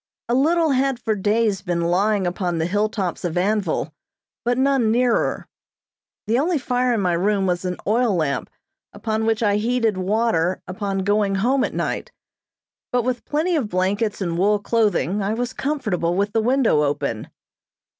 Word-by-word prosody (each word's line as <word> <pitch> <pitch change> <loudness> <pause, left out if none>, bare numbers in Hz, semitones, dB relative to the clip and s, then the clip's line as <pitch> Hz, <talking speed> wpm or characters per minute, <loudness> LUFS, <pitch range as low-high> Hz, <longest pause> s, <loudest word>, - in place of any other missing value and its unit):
A 240 - 0
little 320 +4 +3
had 270 -1 +1
for 225 -2 -1
days 210 0 +1
been 175 -3 -2
lying 190 +4 +1
upon 175 -1 -2
the 160 - 0
hilltops 205 -1 -1
of 175 -1 -2
Anvil, 185 -5 0 0.5
but 245 +1 +1
none 265 -4 +2
nearer. 245 +1 +1 0.8
The 225 +4 +1
only 330 +3 +1
fire 250 -2 0
in 215 - 0
my 180 -2 +1
room 195 +3 +1
was 180 0 -1
an 180 0 -2
oil 225 -1 +2
lamp 155 -5 -1 0.4
upon 220 0 -2
which 225 0 +1
I 205 -1 +3
heated 225 -2 0
water 185 -3 +1
upon 195 0 -3
going 205 0 +1
home 250 +7 +2
at - - -3
night; - - -3 0.8
but 245 -1 +1
with 250 0 -2
plenty 325 +4 0
of 260 -9 -1
blankets 200 +4 -1
and 170 -2 -2
wool 205 +3 +3
clothing 205 - 0
I 200 +3 -1
was 245 +2 -3
comfortable 210 - -1
with 200 +2 0
the 225 - +2
window 245 - +3
open. 140 -6 -2
210 Hz, 165 wpm, -22 LUFS, 185-240 Hz, 0.8 s, little